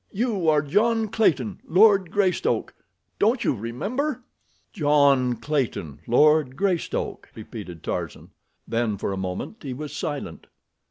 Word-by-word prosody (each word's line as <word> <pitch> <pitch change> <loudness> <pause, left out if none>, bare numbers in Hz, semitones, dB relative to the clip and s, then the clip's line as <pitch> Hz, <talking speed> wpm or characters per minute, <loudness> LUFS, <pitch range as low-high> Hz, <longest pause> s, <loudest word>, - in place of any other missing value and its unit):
You 205 -6 0
are 150 -1 +3
John 220 +8 +1
Clayton, 135 - +1
Lord 195 0 +4
Greystoke—don't 205 +4 -1
you - - +2
remember?" 220 - -3 0.5
"John 140 - +3
Clayton, 115 - -2
Lord 150 +1 +4
Greystoke!" 190 -2 -2
repeated 105 -6 -9
Tarzan. - - -5 0.4
Then 115 -3 -1
for 100 - -3
a - - -4
moment 90 - -5
he 130 -3 -5
was 150 +2 -7
silent. 145 -2 -5
150 Hz, 115 wpm, -24 LUFS, 120-200 Hz, 0.5 s, Lord